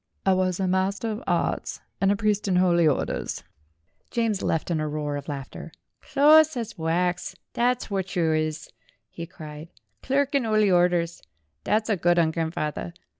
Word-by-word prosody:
"I 190 Hz, -, +4 dB
was 185 Hz, -1 st, 0 dB
a 190 Hz, -, 0 dB
Master 190 Hz, +4 st, 0 dB
of 215 Hz, +4 st, -6 dB
Arts -, -, -1 dB, 0.2 s
and 195 Hz, 0 st, +4 dB
a -, -, +2 dB
priest 210 Hz, -1 st, 0 dB
in 185 Hz, -, +1 dB
Holy 175 Hz, -2 st, +4 dB
Orders." 145 Hz, -, -1 dB, 0.7 s
James 225 Hz, -4 st, 0 dB
left 165 Hz, +2 st, -1 dB
in 165 Hz, -, 0 dB
a 155 Hz, -, -1 dB
roar 150 Hz, -1 st, -3 dB
of 145 Hz, -1 st, -6 dB
laughter. 140 Hz, +2 st, -7 dB, 0.3 s
"Close 310 Hz, +1 st, +5 dB
as 230 Hz, -2 st, -4 dB
wax, 175 Hz, +2 st, -1 dB, 0.2 s
thet's 245 Hz, +1 st, +1 dB
whort 190 Hz, -2 st, -3 dB
you 165 Hz, -3 st, +2 dB
is," 155 Hz, -1 st, -2 dB, 0.4 s
he 170 Hz, 0 st, -7 dB
cried. 155 Hz, -2 st, -10 dB, 0.3 s
"Clerk 280 Hz, +1 st, 0 dB
in 280 Hz, -2 st, +2 dB
'Oly 215 Hz, -3 st, +2 dB
Orders! 175 Hz, -1 st, +2 dB, 0.4 s
Thet's 215 Hz, +1 st, +1 dB
a 215 Hz, -3 st, +1 dB
good 175 Hz, 0 st, +2 dB
'un, 165 Hz, -2 st, +3 dB
grand 160 Hz, 0 st, -3 dB
fawther. 155 Hz, +3 st, -3 dB
180 Hz, 175 wpm, -25 LUFS, 160-215 Hz, 0.7 s, Close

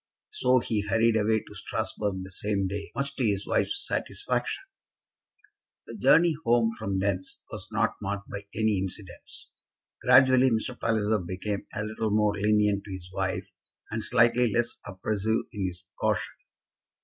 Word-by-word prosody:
So 425 Hz, -, +3 dB
he 110 Hz, -3 st, 0 dB
hurried 110 Hz, +3 st, +2 dB
away 110 Hz, 0 st, +2 dB
to -, -, -14 dB
Strasbourg 100 Hz, -3 st, -3 dB
the 95 Hz, -, -10 dB
same 100 Hz, +1 st, -1 dB
day, 100 Hz, +2 st, -3 dB
much 140 Hz, 0 st, -2 dB
to 135 Hz, -, 0 dB
his 100 Hz, -3 st, +1 dB
wife's 400 Hz, 0 st, +1 dB
satisfaction. 395 Hz, -, -2 dB, 1.2 s
The -, -, -8 dB
journey 170 Hz, 0 st, +5 dB
home 115 Hz, -1 st, +3 dB
from 100 Hz, -1 st, -2 dB
thence 95 Hz, -1 st, -1 dB
was -, -, -6 dB
not -, -, +1 dB
marked 100 Hz, +1 st, -3 dB
by 100 Hz, 0 st, -7 dB
any 110 Hz, -2 st, +2 dB
incidents. 95 Hz, 0 st, -6 dB, 0.5 s
Gradually 130 Hz, 0 st, +6 dB
Mr. 115 Hz, +2 st, -1 dB
Palliser 110 Hz, -1 st, +1 dB
became 95 Hz, +3 st, -4 dB
a 105 Hz, -, -1 dB
little 110 Hz, +1 st, -2 dB
more 105 Hz, 0 st, +3 dB
lenient 105 Hz, -1 st, +2 dB
to 100 Hz, -, -8 dB
his 90 Hz, -1 st, -7 dB
wife 95 Hz, 0 st, -2 dB, 0.4 s
and 110 Hz, 0 st, -2 dB
slightly 120 Hz, 0 st, +4 dB
less 120 Hz, +2 st, +1 dB
oppressive 105 Hz, +3 st, -1 dB
in 100 Hz, -3 st, -1 dB
his 90 Hz, 0 st, -6 dB
caution. -, -, 0 dB
105 Hz, 150 wpm, -28 LUFS, 100-115 Hz, 1.2 s, Gradually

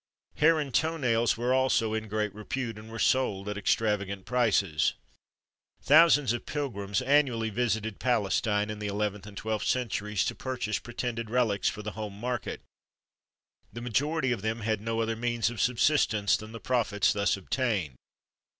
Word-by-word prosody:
Hair 160 Hz, +1 st, +5 dB
and 140 Hz, -4 st, -4 dB
toe 160 Hz, +5 st, +1 dB
nails 120 Hz, -5 st, +1 dB
were 120 Hz, +2 st, +1 dB
also 130 Hz, -4 st, +2 dB
in 110 Hz, 0 st, -3 dB
great 105 Hz, -1 st, -2 dB
repute, 115 Hz, +1 st, -4 dB
and 110 Hz, +1 st, -12 dB
were 115 Hz, -, -6 dB
sold 105 Hz, -3 st, +1 dB
at 105 Hz, -, -3 dB
extravagant 100 Hz, -2 st, 0 dB
prices. 100 Hz, -10 st, +2 dB, 0.9 s
Thousands 150 Hz, -3 st, +6 dB
of 120 Hz, -, -5 dB
pilgrims 110 Hz, -8 st, -2 dB
annually 130 Hz, -5 st, +2 dB
visited 110 Hz, -1 st, -1 dB
Palestine 105 Hz, -2 st, +1 dB
in 105 Hz, -, -6 dB
the 105 Hz, -, -3 dB
eleventh 105 Hz, 0 st, -2 dB
and 100 Hz, -1 st, -11 dB
twelfth 110 Hz, -1 st, -2 dB
centuries, 105 Hz, -5 st, 0 dB
to -, -, -1 dB
purchase 125 Hz, -5 st, -3 dB
pretended 120 Hz, -2 st, -4 dB
relics 115 Hz, -4 st, +1 dB
for 105 Hz, -, -7 dB
the 105 Hz, -, -4 dB
home 105 Hz, -2 st, -7 dB
market. 120 Hz, +1 st, -3 dB, 1.1 s
The 120 Hz, -, -7 dB
majority 130 Hz, +4 st, 0 dB
of 115 Hz, -5 st, -1 dB
them 110 Hz, +2 st, -2 dB
had 110 Hz, -1 st, -1 dB
no 115 Hz, +1 st, -1 dB
other 115 Hz, 0 st, -1 dB
means 120 Hz, 0 st, 0 dB
of 115 Hz, -5 st, -4 dB
subsistence 115 Hz, -4 st, +2 dB
than 110 Hz, +1 st, -7 dB
the 115 Hz, -, -8 dB
profits 115 Hz, -6 st, +1 dB
thus 100 Hz, -1 st, +1 dB
obtained. 100 Hz, -, -1 dB
110 Hz, 160 wpm, -28 LUFS, 105-125 Hz, 1.1 s, Thousands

